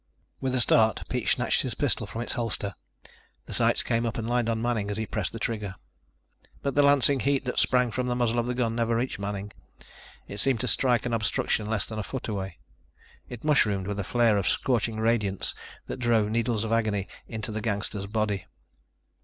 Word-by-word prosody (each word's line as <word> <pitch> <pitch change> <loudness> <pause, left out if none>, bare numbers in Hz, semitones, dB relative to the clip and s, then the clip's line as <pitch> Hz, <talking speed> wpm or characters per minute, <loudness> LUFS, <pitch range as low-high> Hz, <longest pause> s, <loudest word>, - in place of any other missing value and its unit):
With 130 -1 -1
a - - +2
start, 110 -2 +3
Pete - - -1
snatched - - +2
his - - -2
pistol - - +1
from 115 - -5
its - - -2
holster. 110 -4 -2 0.7
The - - -7
sights - - +3
came 115 0 0
up 115 0 -2
and 115 -1 -3
lined 120 -1 +1
on 115 -1 0
Manning 115 -3 -1
as 105 - -3
he 110 - -1
pressed 105 -4 -2
the - - -6
trigger. 105 -4 -3 0.9
But 140 - 0
the 145 - +4
lancing 140 -1 +5
heat 140 +1 +1
that 125 - 0
sprang 125 -2 +3
from 125 +2 -2
the 125 - 0
muzzle 120 -1 +1
of 120 - -1
the 125 - -1
gun 120 -2 0
never 115 0 +1
reached 120 -2 -1
Manning. 100 0 -4 0.7
It 100 - -6
seemed 130 +1 +3
to 125 - -1
strike 125 -1 +2
an 120 - -1
obstruction 110 -1 0
less 110 -2 0
than 110 -1 -5
a - - -2
foot 130 +5 -5
away. 95 -3 -4 0.7
It 120 -2 -8
mushroomed 105 -11 +3
with 100 +1 -3
a - - 0
flare 115 +1 +3
of 100 - 0
scorching 115 -3 +1
radiance 110 -4 +1 0.3
that - - -6
drove 115 -4 +2
needles 115 -1 0
of 115 - -3
agony 110 -4 +1 0.2
into 110 -1 -4
the 110 0 -3
gangster's 100 -2 -2
body. 105 -2 -1
115 Hz, 205 wpm, -27 LUFS, 105-120 Hz, 0.9 s, lancing